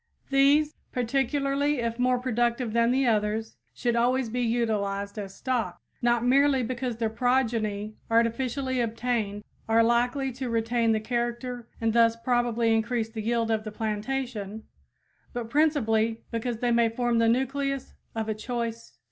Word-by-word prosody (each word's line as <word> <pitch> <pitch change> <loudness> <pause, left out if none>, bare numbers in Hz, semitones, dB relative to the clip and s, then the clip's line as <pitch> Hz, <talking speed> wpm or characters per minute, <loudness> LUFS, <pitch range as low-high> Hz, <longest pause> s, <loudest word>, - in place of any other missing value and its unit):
These, 285 +3 +4 0.2
particularly 275 +3 0
if 235 0 -2
more 250 0 +3
productive 240 -1 0
than 235 0 +3
the 265 +2 +2
others, 220 -1 0 0.2
should 240 -1 -1
always 245 +1 +2
be 245 +2 -2
utilized 210 -4 -1
as 195 -1 -7
stock, 240 -9 -2 0.2
not 240 0 +2
merely 270 +1 +4
because 245 0 -3
their 230 -1 0
progeny 225 -4 0
artificially 250 +3 +1
obtained 225 -3 -2 0.3
are 225 +1 +5
likely 245 +3 +1
to 255 0 -5
retain 230 0 +1
the 220 - +2
character 240 +1 -3
and 225 -1 +1
thus 230 -1 +5
probably 235 -1 +1
increase 225 0 0
the 220 -1 -5
yield 230 +1 0
of 220 -1 0
the 215 - -6
plantation, 220 -1 -3 0.7
but 235 -2 -5
principally 230 -7 +2
because 230 0 -3
they 245 -1 +2
may 235 -1 +4
form 240 0 0
the 230 0 +4
nucleus 270 +2 -1 0.2
of 220 -1 -2
a 220 - 0
choice 230 +1 -4
strain. - - -34
235 Hz, 150 wpm, -27 LUFS, 225-250 Hz, 0.7 s, are